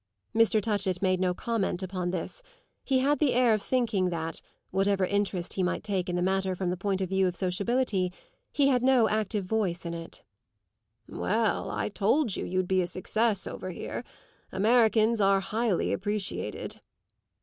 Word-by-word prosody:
Mr. 220 -2 +4
Touchett 195 -4 -1
made 185 -1 +2
no 185 -1 +2
comment 195 -2 -2
upon 185 -1 -3
this; 180 - -4 0.4
he 265 - +2
had 290 +2 +2
the 290 -5 +2
air 245 -2 +4
of 215 - 0
thinking 220 -8 +1
that, 165 -2 -3 0.3
whatever 195 0 +2
interest 195 -2 -1
he 190 - -1
might 180 - -1
take 195 -4 -2
in 175 - -1
the 175 - 0
matter 190 0 0
from 180 -1 -1
the - - -1
point 195 +1 -1
of 185 - -2
view 190 0 +2
of 180 - -3
sociability, 195 +1 0 0.4
he 280 -2 +3
had 250 -3 +3
no 255 -3 +4
active 215 -2 -1
voice 180 -5 -1
in 170 - -3
it. 165 0 -8 0.8
"Well, 220 +2 0
I - - -2
told 210 +3 +1
you - - -3
you'd 185 0 -1
be 185 0 +2
a 175 - -1
success 205 +3 0
over 185 - -6
here. 180 - -5 0.5
Americans 220 +1 +3
are 195 0 +4
highly 215 0 0
appreciated." 205 0 -3
195 Hz, 170 wpm, -28 LUFS, 185-220 Hz, 0.8 s, Mr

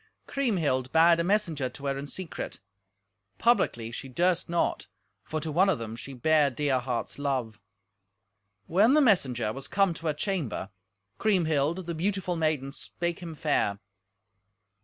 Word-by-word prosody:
Kriemhild 160 - 0
bade 165 +1 +5
a - - +2
messenger 170 -9 0
to 140 +3 -10
her 140 0 0
in 140 +1 -5
secret; 180 +3 -6 0.8
publicly 120 - +2
she 135 +3 -7
durst 175 +7 +1
not, 170 0 0 0.4
for 155 - -3
to 155 0 -4
one 185 +6 +4
of - - +2
them 115 -1 -6
she 135 - -8
bare 145 +3 +3
dear 135 0 0
heart's 125 +1 -4
love. 130 -7 -2 1.0
When 210 - +4
the - - +6
messenger 130 - +2
was 135 0 -7
come 195 -3 +2
to 165 0 -6
her 155 - +2
chamber, 150 - -3 0.5
Kriemhild, 170 -4 +1
the 170 - -3
beautiful 185 +1 -1
maiden, 155 -4 0
spake 170 +4 -4
him 170 -3 -7
fair. 145 -9 +1
155 Hz, 150 wpm, -28 LUFS, 135-180 Hz, 1.0 s, the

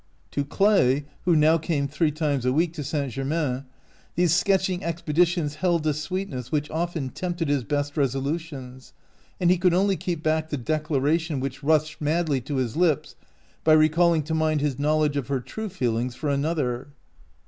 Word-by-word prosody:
To 145 - -1
Clay, 145 -5 +3 0.2
who 175 -2 +4
now 155 +2 +4
came 150 -3 -1
three 150 +3 +1
times 150 -3 -1
a 125 - +2
week 160 +4 +1
to 155 -3 -5
St. 140 -1 -2
Germain, 135 0 -2 0.5
these 175 -1 +3
sketching 190 0 +2
expe 170 -3 -4
ditions 170 -3 +2
held 170 -2 +1
a 155 - +2
sweetness 150 -4 -4
which 150 -1 -1
often 165 -4 -2
tempted 175 +1 -3
his 145 -3 +1
best 145 +1 -2
resolutions, 135 -1 -3 0.5
and 175 -1 +4
he 180 - +2
could 180 -1 +3
only 195 +1 +3
keep 170 -1 -4
back 155 0 0
the 145 - -2
declaration 155 +2 0
which 135 +1 -4
rushed 155 +1 +1
madly 155 -2 +1
to 145 +4 -5
his 125 -4 -1
lips 155 -3 +1 0.5
by 155 - +5
recalling 155 +1 +4
to 160 +3 -4
mind 155 -1 +1
his 145 -2 -1
knowledge 150 0 +1
of 140 - -2
her 140 -1 0
true 215 - -6
feelings 125 - -1
for 150 +3 -3
another. 140 -4 -1
155 Hz, 175 wpm, -25 LUFS, 140-170 Hz, 0.5 s, by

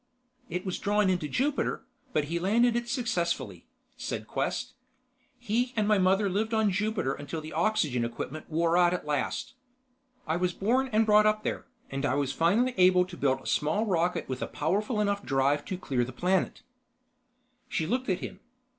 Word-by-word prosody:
"It 180 +2 -3
was 185 - -3
drawn 205 -1 +2
into 175 -4 -1
Jupiter, 280 - -1 0.3
but 155 - +1
he 165 +4 -2
landed 230 +6 +3
it 240 0 -2
successfully," 205 -10 -2 0.3
said - - -4
Quest. 255 0 -2 0.6
"He 245 +2 -1
and 210 -2 +1
my 210 -2 +4
mother 190 +2 +3
lived 215 +4 0
on 220 -2 +3
Jupiter 205 -7 0
until 145 +3 -5
the 155 0 -8
oxygen 155 - +1
equipment 125 +6 -5
wore 165 +1 +1
out 175 0 +4
at 180 - -6
last. 150 - -2 0.7
I 160 +1 0
was 180 0 0
born 255 +8 +1
and 220 +1 +3
brought 210 0 +5
up 215 0 +1
there, - - -3 0.2
and 135 +1 -3
I 140 - +1
was 140 -2 0
finally 220 +10 +2
able 180 0 +5
to 180 -1 -10
build 135 -4 +1
a - - -17
small 155 +9 +1
rocket 180 -3 0
with 130 -1 -4
a - - -2
powerful 205 - -1
enough 200 -1 0
drive 140 0 +1
to 185 - -4
clear 130 -9 -1
the 125 - -5
planet." 180 +8 0 1.1
She 160 - -1
looked 250 +7 -1
at 185 - 0
him. - - -7
185 Hz, 180 wpm, -28 LUFS, 155-215 Hz, 1.1 s, brought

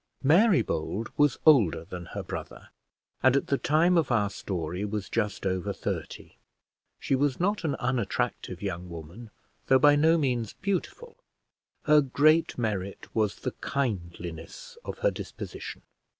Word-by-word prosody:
Mary 180 +8 +5
Bold 105 +8 -3
was 145 -3 +3
older 110 - +5
than 90 +1 -7
her - - -6
brother, - - -8 0.5
and, 130 +1 +5
at 140 - +2
the 140 - +1
time 170 +4 +3
of 145 -5 -1
our 105 -4 +2
story, 90 -1 -4
was 105 -1 -3
just 105 -3 -2
over 95 -2 -1
thirty. - - -5 0.6
She - - -1
was 135 0 +1
not 200 +3 0
an 145 -4 0
unattractive 125 -6 -2
young 90 -2 -4
woman, 85 +8 -9 0.4
though 130 - +6
by 145 +2 +6
no 160 +3 +4
means 125 -7 -1
beautiful. 200 - -4 0.7
Her 150 0 +6
great 155 +4 +3
merit 100 -5 -3
was 110 -3 +1
the - - -2
kindliness 105 - -4
of - - -6
her - - +5
disposition. - - -8
125 Hz, 145 wpm, -28 LUFS, 100-150 Hz, 0.7 s, though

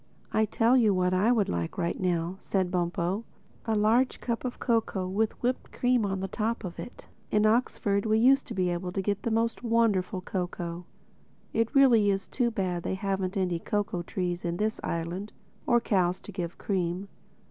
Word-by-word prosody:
"I 220 - +3
tell 230 +4 +3
you 220 -6 +4
what 180 0 +2
I 200 +6 +3
would 220 -5 +2
like 85 -1 -3 0.2
now," 175 0 -1
said 185 -3 -1
Bumpo: 180 +3 -1 0.4
"a 220 - +2
large 225 +5 +3
cup 235 -2 -3
of 250 -1 -4
cocoa 220 -5 0
with 210 +4 0
whipped 250 +1 -1
cream 245 -4 +2
on 190 -1 -2
the 195 - -2
top 225 +4 -2
of 180 -3 -6
it. 245 - -9 0.2
In 210 0 +3
Oxford 215 -2 +1
we 215 0 +3
used 270 +4 +4
to - - -6
be 180 -2 +1
able 175 +1 -3
to 195 - -1
get 200 0 -1
the - - -1
most 230 +1 0
wonderful 225 -6 +1
cocoa. 175 -2 -4 0.7
It 225 0 +2
is - - -24
really 225 -8 +5
too 245 -2 +1
bad 185 -5 -2
they 190 - -2
haven't 195 0 -2
any 180 -3 0
cocoa 205 -2 -1
trees 175 0 -3
in 170 0 -2
this 215 +2 -1
island, 170 +5 -3 0.3
or 240 - +5
cows 185 -5 +1
to - - -9
give 180 -3 -5
cream." 185 0 -2
200 Hz, 185 wpm, -28 LUFS, 180-225 Hz, 0.7 s, really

